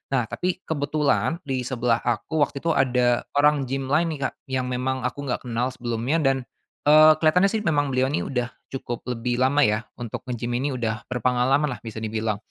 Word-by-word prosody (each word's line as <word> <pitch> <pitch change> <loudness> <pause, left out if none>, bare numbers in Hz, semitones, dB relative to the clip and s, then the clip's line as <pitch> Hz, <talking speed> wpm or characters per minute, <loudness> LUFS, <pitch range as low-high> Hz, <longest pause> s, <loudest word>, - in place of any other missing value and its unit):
Nah, 125 - +2
tapi 180 0 -2
kebetulan 150 +2 0
di 130 -3 -3
sebelah 120 -2 +1
aku 120 +7 -2
waktu 140 - -9
itu 165 - +2
ada 125 -4 +2
orang 145 -1 +3
gim 135 +1 -3
lain 160 +3 +3
nih, - - -10
Kak, - - -32
yang 130 -1 -2
memang 130 +1 -2
aku 125 +3 -3
nggak 125 - -2
kenal 120 0 -1
sebelumnya 125 +1 -2
dan, 135 -1 +3 0.5
eee, 155 +1 +8
keliatannya 180 +5 +4
sih 220 - 0
memang 145 -4 +2
beliau 130 0 +2
ini 145 - -1
udah 125 -3 -2 0.3
cukup 120 -2 -5
lebih 120 0 -2
lama 140 +3 +3
ya 105 -1 +1
untuk 120 -3 -5
ngegim 120 -1 -3
ini 140 0 -1
udah 115 -2 -3
berpengalaman 125 +3 +1
lah 125 - -6
bisa 115 -2 -9
dibilang. 110 0 -1
130 Hz, 190 wpm, -24 LUFS, 120-145 Hz, 0.5 s, eee